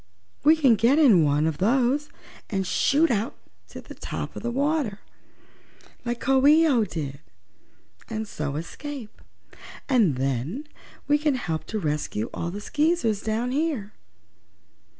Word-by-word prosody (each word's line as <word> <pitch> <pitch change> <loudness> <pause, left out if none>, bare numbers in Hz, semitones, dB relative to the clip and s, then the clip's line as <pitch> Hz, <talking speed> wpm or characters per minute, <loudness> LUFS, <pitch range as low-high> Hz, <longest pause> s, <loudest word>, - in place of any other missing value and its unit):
We 310 +3 +6
can 280 -7 +4
get 240 +7 +4
in 235 - +6
one 145 +1 +2
of 160 -2 -1
those, 255 +7 +2 0.4
and 195 -2 -1
shoot 300 - +2
out 220 0 -1 0.3
to - - -10
the - - -11
top - - -6
of - - -6
the 240 - -2
water, 275 -4 0 1.1
like 240 0 -3
Coo 270 +2 +3
ee 315 +2 +6
oh 245 -7 +3
did, 140 -7 -5 0.9
and 220 -1 -4
so 150 -6 -4
escape. 245 - -7 0.7
And 225 - +3
then 135 - -2 0.4
we 295 +1 +3
can 300 -2 +1
help 165 -10 -3
to 220 - -4
rescue 150 - -2
all 170 - -3
the 200 +4 -6
Skeezers 295 - +1
down 225 +3 -1
here." 270 -8 -2
230 Hz, 145 wpm, -25 LUFS, 170-285 Hz, 1.1 s, We